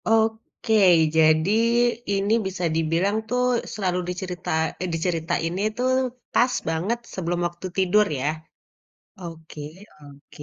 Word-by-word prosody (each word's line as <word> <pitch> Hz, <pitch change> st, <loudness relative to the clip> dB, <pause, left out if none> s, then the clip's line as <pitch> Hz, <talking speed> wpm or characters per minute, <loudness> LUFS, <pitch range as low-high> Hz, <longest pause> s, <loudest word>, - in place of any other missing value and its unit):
Oke. 225 Hz, 0 st, 0 dB, 0.4 s
Jadi, 155 Hz, +3 st, +4 dB, 0.6 s
ini 200 Hz, +2 st, +1 dB
bisa 185 Hz, -1 st, -5 dB
dibilang 165 Hz, +5 st, +1 dB
tuh, 250 Hz, 0 st, +1 dB, 0.3 s
selalu 185 Hz, -4 st, -1 dB
dicerita 180 Hz, 0 st, -5 dB, 0.3 s
eh, 185 Hz, -, -2 dB
diceritainnya 165 Hz, +2 st, -1 dB
itu, 230 Hz, +3 st, -5 dB, 0.5 s
pas 250 Hz, +1 st, +3 dB, 0.2 s
banget 180 Hz, +9 st, -1 dB
sebelum 175 Hz, -1 st, -2 dB
waktu 175 Hz, +2 st, -8 dB
tidur, 190 Hz, +3 st, +4 dB
ya? 135 Hz, -, -1 dB, 0.9 s
Oke 160 Hz, -3 st, -9 dB, 0.4 s
oke, 145 Hz, +1 st, -14 dB
180 Hz, 110 wpm, -24 LUFS, 165-205 Hz, 0.9 s, Jadi